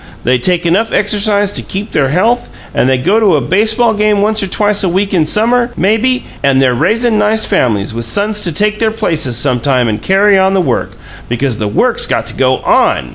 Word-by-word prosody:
They 125 +1 +1
take 175 +5 0
enough 200 +7 +1
exercise 205 0 +1
to - - -3
keep 200 +3 -6
their 135 -3 0
health; 225 - 0 0.2
and 130 - +1
they 130 - +2
go 185 - +1
to 200 -7 +3
a - - +2
baseball 220 - +1
game 210 -1 +1
once 215 +1 0
or 195 - -2
twice 205 +2 0
a 185 - +1
week 195 +3 -1
in 160 -4 +1
summer, 235 +6 +1
maybe, 225 +6 0 0.2
and 135 -1 +2
they're 130 -2 +2
raisin' 225 - 0
nice 215 +1 +1
families, 110 -3 -1
with 115 0 -4
sons 205 - -1
to 170 - -1
take 210 +6 -1
their 225 - +1
places 165 - -2
sometime 125 +1 0
and 105 -1 -3
carry 195 +1 +3
on 190 +1 +2
the - - +2
work 180 - -2 0.4
because 120 0 -2
the 105 - -2
work's 105 - 0
got - - -1
to - - -8
go 130 -1 +1
ON! 65 - +1
195 Hz, 215 wpm, -12 LUFS, 135-215 Hz, 0.4 s, to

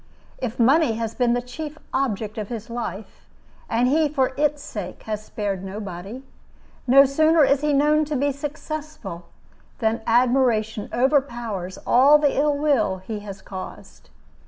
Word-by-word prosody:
If 250 -1 -4
money 270 +2 +4
has 225 0 -3
been 245 -2 +2
the 245 0 -1
chief 300 +5 -7 0.2
object 220 -4 -1
of 210 - -4
his 230 -1 -6
life, 220 -4 -6 0.4
and 235 +2 +2
he 305 +3 +3
for 265 -3 0
its 295 0 0
sake 200 -9 -7
has 215 -1 -4
spared 200 -3 -4
nobody, 195 +4 -7 0.6
no 275 +3 +8
sooner 310 +3 +4
is 275 0 +2
he 300 0 +1
known 300 +2 +3
to 300 0 -3
be 285 +2 +1
successful 295 - -6 0.5
than 225 0 0
admiration 235 -3 +2
overpowers 240 -8 0
all 275 +5 +6
the 295 -2 +1
ill 290 0 +2
will 275 -10 +1
he 205 +3 -6
has 200 -2 -9
caused. 190 -1 -10
245 Hz, 150 wpm, -23 LUFS, 215-285 Hz, 0.6 s, no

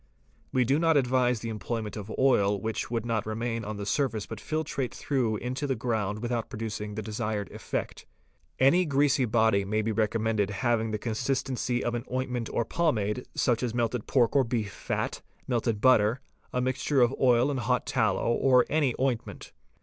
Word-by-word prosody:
We 125 -1 +2
do 135 +5 +2
not 165 -2 +4
advise 125 -3 +2
the 115 - -4
employment 110 0 -4
of 105 0 -7
oil 105 -7 +3
which 110 +2 -3
would 115 -1 -2
not 110 -2 -1
remain 115 +1 -2
on 105 0 -5
the 100 - -5
surface 115 -2 0
but 110 - -7
filtrate 150 -3 -2
through 120 -6 0
into 130 +6 -3
the 135 - 0
ground 110 -2 -2
without 120 -1 -2
producing 105 -1 -5
the 110 - -4
desired 105 -1 -3
effect. - - -5 0.5
Any 150 +8 +5
greasy 140 -2 +2
body 110 -3 +3
may 110 +2 -1
be 110 - 0
recommended 110 -1 0
having 115 +2 0
the 110 - -1
consistency 125 +2 -1
of 120 - -1
an 120 +1 -3
ointment 125 -2 -2
or 115 - 0
pommade, 125 -9 0
such 120 -3 +1
as 120 -2 -2
melted 120 -1 -1
pork 125 -2 +2
or 140 - +5
beef 115 -4 -2
fat, - - -3 0.3
melted 115 -4 0
butter, 115 -1 +4 0.3
a 125 - 0
mixture 130 +2 +1
of 120 +1 +4
oil 125 +1 +4
and 135 - -2
hot 125 +2 0
tallow, 115 -1 +1
or 125 -1 +4
any 145 -6 +2
ointment. 130 -3 -2
120 Hz, 180 wpm, -28 LUFS, 110-130 Hz, 0.5 s, Any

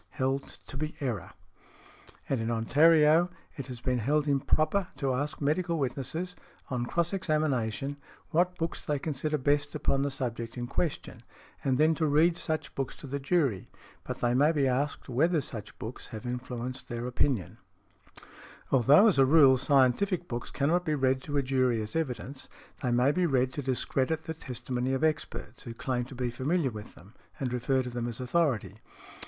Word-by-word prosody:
Held 135 0 -2
to 135 - -8
be 155 +2 -3
error. 120 -9 -3 0.9
And 130 -4 0
in 115 - -2
Ontario 155 +8 +5 0.3
it 140 - -6
has 125 -3 -8
been 130 -1 0
held 145 +6 +1
improper 155 +6 +2
to 135 -3 0
ask 145 +4 -2
medical 165 +4 0
witnesses, 145 +6 -3 0.4
on 120 -1 -1
cross 170 +5 0
examination, 145 - -1 0.3
what 180 +2 +2
books 165 0 -3
they 150 -2 0
consider 150 +1 -2
best 145 +1 +1
upon 135 - +1
the 140 - 0
subject 120 -3 -4
in 120 - -3
question, 155 +5 -3 0.4
and 130 -2 +2
then 155 +3 +4
to 160 0 0
read 160 +4 +4
such 160 -2 -3
books 135 -2 -3
to - - -11
the 140 +1 -3
jury; 135 - +1 0.4
but - - -6
they 120 0 +2
may 145 +5 +4
be 145 -4 +2
asked 135 +3 -1
whether 155 +7 +2
such 115 -6 -7
books 110 +3 -7
have 110 0 -8
influenced 125 +1 -5
their 120 0 -4
opinion. 125 - -1 1.1
Although, 140 - +6
as 205 -10 +4
a - - +8
rule, 140 -3 +7
scientific 145 - +2
books 120 0 -4
cannot 165 +6 +1
be 155 -3 0
read 130 -1 +1
to 145 -1 -2
a 140 - +2
jury 130 -3 +2
as 110 +4 -5
evidence, 135 -3 -3 0.3
they 125 - 0
may 125 +3 +3
be 180 +3 +1
read 130 -3 +1
to 145 - -3
discredit 135 +4 -1
the 160 - -4
testimony 125 -3 -3
of 135 - -2
experts, 155 -2 -2
who 115 -2 -7
claim 125 0 -2
to 130 - -11
be 125 -1 -2
familiar 140 +3 0
with 105 -1 -9
them 95 +5 -16 0.3
and 125 -3 -2
refer 130 +2 +1
to 125 - -6
them 120 0 -3
as 120 0 -5
authority. 130 - 0
135 Hz, 180 wpm, -29 LUFS, 125-155 Hz, 1.1 s, a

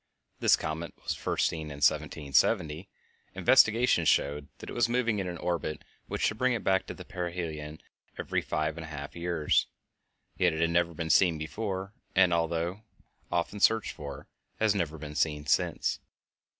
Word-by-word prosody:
This - - +5
comet 80 +1 -5
was - - -1
first - - 0
seen 80 -2 -2
in 75 - -7
1770. 75 - +1 0.5
Investigation 110 -5 +5
showed 75 -2 +2
that - - -10
it - - -6
was 120 0 +2
moving 120 -3 +1
in 95 - -2
an 90 -1 -4
orbit 85 -2 -2 0.2
which - - -3
should 110 - +1
bring 130 0 +3
it 115 - -3
back 95 0 +2
to - - -6
perihelion 85 -5 -5 0.4
every - - -1
five 75 +1 -2
and 80 - -6
a - - -9
half 70 -2 -7
years; 85 -3 +1 0.7
yet 90 -3 +3
it 80 - -3
had 85 0 +2
never 85 0 +1
been 80 0 -1
seen 85 -2 +5
before 95 +4 -4 0.2
and, 90 -2 +5
although 85 +3 -1 0.5
often 85 +4 -1
searched 110 +1 +3
for, 70 -3 -8 0.3
has 110 -2 +3
never 85 -5 -2
been 75 -1 -7
seen 75 -1 0
since. - - +1
85 Hz, 165 wpm, -29 LUFS, 75-95 Hz, 0.7 s, This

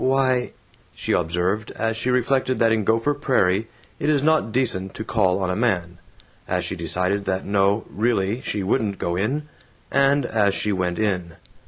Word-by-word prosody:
"W - - +2
why 130 -2 +1 0.2
" - - -32
she - - -3
observed, 90 +5 0
as 115 0 -1
she 120 +3 -1
reflected 130 +1 +1
that 115 -1 +3
in 110 -1 +1
Gopher 115 +7 +2
Prairie 115 -8 +1 0.3
it 145 - 0
is 145 -2 +2
not 155 -7 +2
decent 110 -7 0
to 110 - -4
call 95 -5 +1
on 95 -2 -1
a - - -1
man; 90 -7 -1 0.5
as - - -1
she - - -1
decided 95 +3 -1
that 95 0 -2
no, 100 +2 +2
really, 110 0 0
she 105 -6 -2
wouldn't 100 0 0
go 85 0 -2
in; 135 +11 -1 0.4
and 140 0 +3
as 105 -4 +1
she 105 - 0
went 90 -2 -1
in. 90 -6 -1
110 Hz, 185 wpm, -23 LUFS, 95-125 Hz, 0.5 s, that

